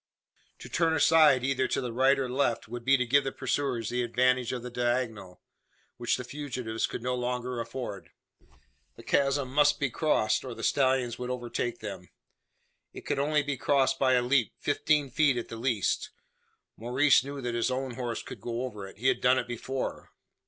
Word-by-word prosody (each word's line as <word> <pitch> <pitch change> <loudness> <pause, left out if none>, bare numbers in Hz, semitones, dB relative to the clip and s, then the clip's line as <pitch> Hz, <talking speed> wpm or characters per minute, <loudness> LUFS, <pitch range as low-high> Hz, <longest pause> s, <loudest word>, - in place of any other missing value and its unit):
To - - -10
turn 165 -1 +1
aside, 155 -4 +5
either 130 0 +1
to - - -1
the 125 -3 -4
right 135 +3 +4
or 135 -1 -1
left, 125 -2 0
would 120 +2 -7
be 135 +2 +4
to 125 - 0
give 140 +4 +3
the 135 - -2
pursuers 130 -4 -2
the 125 0 -1
advantage 125 +1 +1
of 125 -2 -4
the 125 - -7
diagonal; 120 -6 -2 0.5
which 120 -1 0
the 125 - -5
fugitives 125 -4 -3
could - - -6
no 125 0 -1
longer 125 0 -3
afford. 115 -7 -6 0.9
The - - -13
chasm 140 -2 +1
must 145 0 +4
be 140 -3 0
crossed, 115 -9 +1
or 125 -3 -6
the - - -8
stallions 130 -3 +1
would 125 0 -4
overtake 120 -1 -3
them. 95 -4 -7 0.8
It - - -10
could - - -1
only 150 +1 +2
be 140 -1 -3
crossed 135 -1 +2
by 130 -1 +3
a 125 -1 +3
leap 125 -2 +2
fifteen 145 -1 +1
feet 140 -1 +3
at 120 - -4
the - - -6
least. 115 -4 0 0.7
Maurice 130 +4 +3
knew 140 +1 -6
that 120 -2 -3
his 120 +2 0
own 130 0 -2
horse 120 -1 -4
could - - -10
go 120 +1 -3
over 105 -6 -6
it 95 - -14
he 120 +5 -1
had - - +2
done 125 +1 +4
it - - -2
before. 125 +2 -4
125 Hz, 195 wpm, -28 LUFS, 120-135 Hz, 0.9 s, aside